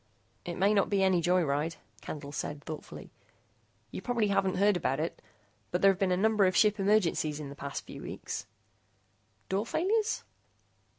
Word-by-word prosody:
"It 175 - -4
may 200 +3 +3
not 200 - +2
be 200 -1 +2
any 185 -2 +3
joy 180 +1 +3
ride," 150 +2 -1 0.3
Candle 145 -2 -7
said 145 0 -4
thoughtfully. 155 -1 -8 0.8
"You - - -5
probably 235 -4 0
haven't 190 -1 +1
heard 200 +2 +4
about 135 -5 0
it, 160 +2 -3 0.5
but 180 - -2
there've 195 -1 +5
been 195 -2 +2
a 180 - +2
number 215 0 +4
of 185 - 0
ship 210 -1 +4
emergencies 185 -7 +2
in 145 -2 -6
the 140 - -9
past 140 0 -6
few - - -9
weeks." - - -6 1.0
"Door 200 +4 -1
failures?" 425 - 0
185 Hz, 170 wpm, -30 LUFS, 160-205 Hz, 1.0 s, there've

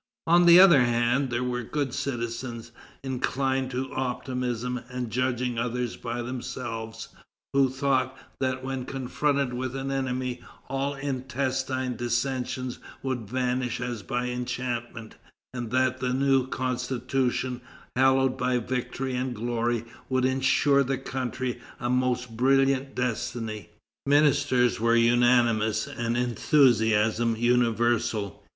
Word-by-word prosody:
On 175 +1 +5
the 170 +1 +10
other 175 -8 +8
hand, 120 +2 +2
there 120 0 -1
were 125 0 -1
good 140 +1 -2
citizens, 120 -2 -4 0.3
inclined 130 0 -1
to 130 +1 -4
optimism 125 -1 -2
and 125 -2 -4
judging 125 -1 0
others 120 0 -2
by 120 0 -4
themselves, 115 -2 -5 0.4
who 135 -1 +4
thought 130 0 0 0.2
that 130 -1 -1
when 135 -1 -3
confronted 140 0 -1
with 130 +1 -3
an 135 0 -3
enemy, 130 -2 -2 0.3
all 135 +1 -1
intestine 130 -2 -2
dissensions 125 +1 -2 0.2
would 125 -6 -3
vanish 125 -1 -1
as 125 -3 -4
by 125 +4 -2
enchantment, 120 -2 -4 0.4
and 120 -3 -4
that 130 +1 +1
the 125 -1 -1
new 135 -1 +2
Constitution, 130 0 -1 0.3
hallowed 130 0 +3
by 125 0 +1
victory 125 +2 -3
and 125 0 -2
glory, 120 0 -1 0.2
would 130 -1 +2
ensure 135 +2 +3
the 135 0 -1
country 130 -1 -4 0.2
a 120 - -1
most 125 -2 0
brilliant 135 +2 +2
destiny. 115 -5 -3 0.4
Ministers 140 -5 +3
were 115 +1 +3
unanimous, 115 -2 +3
and 120 0 -2
enthusiasm 115 -3 +3
universal. 120 -3 +1
125 Hz, 120 wpm, -27 LUFS, 120-130 Hz, 0.4 s, the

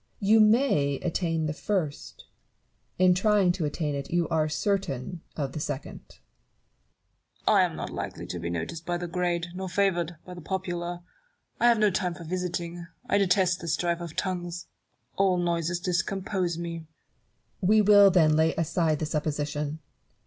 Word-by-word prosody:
You 215 +2 +4
may 215 - +4
attain 165 -2 -1
the 150 - -1
first; 165 -5 -3 0.7
in 185 0 +5
trying 195 -1 +3
to 175 -3 -2
attain 150 0 -2
it, 140 -1 -4
you 170 -1 +1
are 155 -1 +1
certain 170 -4 -2
of 140 -3 -3
the 155 - -5
second. 145 -2 -5
Newton. - - -20 1.3
I - - +6
am - - 0
not - - -5
likely - - -5
to 90 - -5
be 85 0 -4
noticed 85 - -4
by 175 +1 -2
the 175 - -4
great, 175 -1 -1
nor 190 +1 -5
favoured 175 -3 0
by 180 - -9
the 175 - -9
popular. 175 -1 -4 0.6
I 240 - +4
have 235 -1 +5
no 210 -1 +3
time 180 -1 -1
for 170 - -9
visiting: 175 0 -4 0.2
I 200 - +2
detest 185 -2 +2
the 170 - -7
strife 170 +2 0
of 170 -2 -7
tongues; 175 -2 -3 0.5
all 190 -2 +3
noises 170 -1 0
discompose 185 -1 -1
me. 170 -1 -4
Barrow. 160 - -14 0.8
We 215 0 +6
will 205 -1 +8
then 160 -5 +4
lay 160 +1 +2
aside 165 -1 +1
the 155 - -2
supposition. 150 0 -2
175 Hz, 165 wpm, -27 LUFS, 160-185 Hz, 1.3 s, will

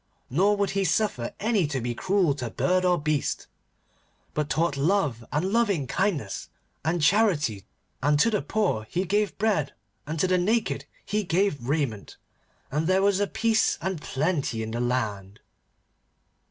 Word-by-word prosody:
Nor 200 +9 +3
would 200 -1 0
he 195 0 0
suffer 180 - 0
any 210 -6 +1
to 140 -2 -2
be 120 0 -2
cruel 185 +2 +2
to 130 -4 -5
bird 185 +9 +1
or 180 -1 +3
beast, 150 -1 -1 0.9
but 150 -1 -1
taught 165 -2 +1
love 145 - +1
and 180 +7 0
loving 205 - +2
kindness 155 - -2 0.3
and 160 +2 0
charity, 150 - +2 0.3
and 145 +1 +3
to 230 - +4
the 210 - +1
poor 180 - -1
he 180 +2 -1
gave 205 +2 0
bread, 195 -10 +1 0.3
and 160 +1 -3
to - - +3
the 185 0 +2
naked 215 +5 0 0.2
he 210 0 -1
gave 165 -8 0
raiment, 140 -9 -2 0.5
and 150 +4 0
there 190 +1 +3
was 200 0 +3
peace 225 -1 +2
and 190 -4 -3
plenty 140 -7 -1
in 110 - -5
the 120 - -3
land. 105 -5 -2
165 Hz, 155 wpm, -26 LUFS, 135-200 Hz, 0.9 s, to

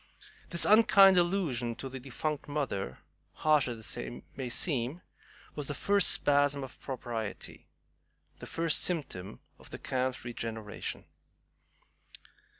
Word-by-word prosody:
This 170 - +4
unkind 200 -3 +7
allusion 155 -11 0
to 135 - -6
the 130 0 -7
defunct 135 +4 -4
mother, 135 - -3 0.4
harsh 155 -3 +3
as 115 -3 -5
it 120 0 -6
may 130 -2 -4
seem, 135 +3 -1 0.5
was 145 -2 -5
the 145 - -2
first 200 +5 +3
spasm 145 -1 +2
of 130 - -10
propriety, 120 -5 -6 0.7
the - - -8
first 165 -2 +1
symptom 140 - -2 0.2
of - - -13
the - - -7
camp's 130 -1 -2
regeneration. 115 -3 -5
135 Hz, 120 wpm, -31 LUFS, 120-155 Hz, 0.7 s, unkind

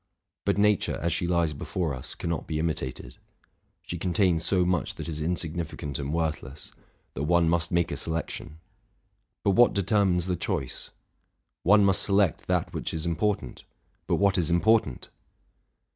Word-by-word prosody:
But - - +1
nature, 105 -1 +2
as 85 +1 0
she 85 - -1
lies 85 -3 +1
before 80 +2 -3
us, 65 -1 -8
cannot 85 -1 -3
be 80 - -2
imitated: 70 -6 -3 0.6
she 85 - -5
contains 90 -2 +2
so 90 0 +2
much 90 -2 0
that - - -6
is 80 -2 -4
insignifi 85 0 -2
cant 70 -1 -4
and 70 0 -3
worthless, 75 -4 -3 0.4
that - - -5
one 85 +1 +3
must 85 0 +1
make 85 -1 +1
a - - -2
selection; 80 0 -4 0.9
but 100 - +3
what 120 +5 +5
determines 95 -3 +2
the 90 -1 0
choice? 65 -6 -4 0.7
one 100 +2 +5
must 95 -1 +3
select 100 -4 +1
that - - 0
which - - -3
is 80 +1 -3
important: 85 - -1 0.4
but - - +2
what 100 -1 +3
is 85 -2 0
important? 85 - +2
85 Hz, 160 wpm, -27 LUFS, 80-95 Hz, 0.9 s, what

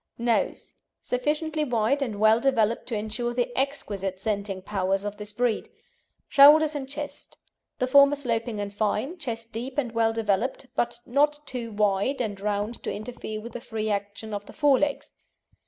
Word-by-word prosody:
NOSE 235 -1 0 0.3
Sufficiently 305 +4 -1
wide 245 +1 +1
and 220 -7 -2
well 220 +1 +5
developed 230 -4 +1
to 235 - -2
ensure 220 +3 -2
the 245 0 -1
exquisite 200 -9 -2
scenting 200 -2 -2
powers 195 0 -1
of 205 0 -4
this 210 0 -7
breed. 240 +1 -1 0.6
SHOULDERS 300 +2 +7
AND 275 -3 -5
CHEST 290 +1 -6 0.4
The 255 - +1
former 280 +2 +6
sloping 230 -5 -2
and 200 0 -4
fine, 220 - -1
chest 230 -6 -5
deep 250 +5 -5
and 250 -5 0
well 225 -1 +2
developed, 225 +4 -1
but 235 0 -1
not 295 +4 +2
too 240 -3 -5
wide 210 +5 +1
and 205 -5 -3
round 210 +2 -2
to - - -3
interfere 215 0 -6
with 235 +2 -8
the 245 - -6
free 220 -3 -3
action 205 +2 -4
of 205 0 -5
the - - -11
fore 290 -4 +4
legs. 290 -1 -2
230 Hz, 170 wpm, -26 LUFS, 210-270 Hz, 0.6 s, SHOULDERS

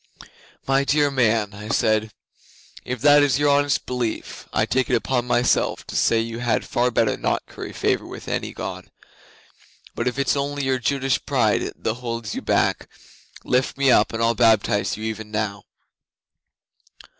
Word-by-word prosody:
'"My 135 +1 +3
dear 145 0 +2
man," 115 -5 +1
I 105 +1 -9
said, 110 -1 +1 0.7
"if 125 -2 -5
that 145 +1 +6
is 140 -3 +3
your 145 0 +2
honest 145 -1 +2
belief, 125 -3 -4
I - - +1
take 130 -2 0
it - - +3
upon 125 -2 -1
myself 120 0 +1
to - - -8
say 115 - +3
you 115 +1 -4
had 120 -2 0
far 125 +1 +1
better 115 -2 +1
not - - -1
curry - - -8
favour - - -1
with - - -10
any - - -2
God. - - -7 1.0
But 120 - -3
if 125 - -2
it's 140 +1 +1
only 140 0 -2
your 130 -1 0
Jutish 135 +2 0
pride 120 -7 +1
that 110 - -2
holds 115 -2 -5
you - - -4
back, - - 0 0.5
lift 125 +1 0
me 135 -1 +3
up, - - +4
and 115 0 -2
I'll 115 0 +3
baptize 110 -2 +2
you 110 - -7
even 110 -1 -5
now." 105 -1 -3
120 Hz, 170 wpm, -22 LUFS, 110-135 Hz, 1.0 s, that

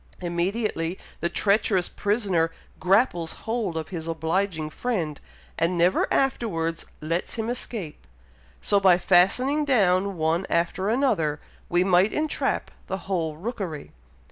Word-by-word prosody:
Immediately 175 0 -1 0.2
the 170 - 0
treacherous 200 -2 +2
prisoner 200 -6 0 0.3
grapples 180 -4 +2
hold 220 -7 -1
of 160 - -4
his 165 -3 -5
obliging 165 0 -1
friend, 175 - -2 0.4
and 170 +2 +1
never 175 +2 +2
afterwards 170 -11 0
lets 165 +3 -2
him 225 0 -2
escape; 210 -10 -6 0.5
so, 200 - +2
by 190 -3 +5
fastening 195 +12 +3
down 200 -8 +2
one 165 +3 0
after 175 +3 0
another, 215 - +1 0.3
we 175 +1 +3
might 185 +2 +3
entrap 310 0 -1 0.2
the 190 - -2
whole 165 -5 -2
rookery." 185 - -5
185 Hz, 120 wpm, -25 LUFS, 165-215 Hz, 0.5 s, by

